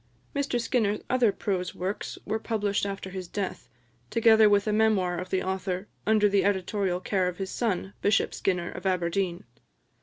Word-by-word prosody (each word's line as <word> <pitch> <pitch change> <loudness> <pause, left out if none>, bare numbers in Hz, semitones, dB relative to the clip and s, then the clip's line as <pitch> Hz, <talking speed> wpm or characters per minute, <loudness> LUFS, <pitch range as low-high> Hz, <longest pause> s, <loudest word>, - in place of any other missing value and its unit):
Mr 280 -3 0
Skinner's 220 -3 0
other 250 -4 +4
prose 185 -3 -2
works 190 +3 -4
were 220 - -1
published 205 -3 -1
after 195 -1 -5
his 185 -1 -6
death, 200 +1 -4 0.4
together 220 -2 +6
with 205 -1 +3
a 215 - 0
Memoir 200 -5 +2
of 185 0 -6
the 185 0 0
author, 190 0 -2 0.2
under 215 -1 +5
the 200 -1 +2
editorial 190 -1 0
care 185 0 0
of 180 -1 -4
his 190 -1 -4
son, 200 -4 -1
Bishop 205 0 +2
Skinner 180 -2 -1
of - - -5
Aberdeen. 180 0 0
200 Hz, 170 wpm, -27 LUFS, 185-215 Hz, 0.4 s, together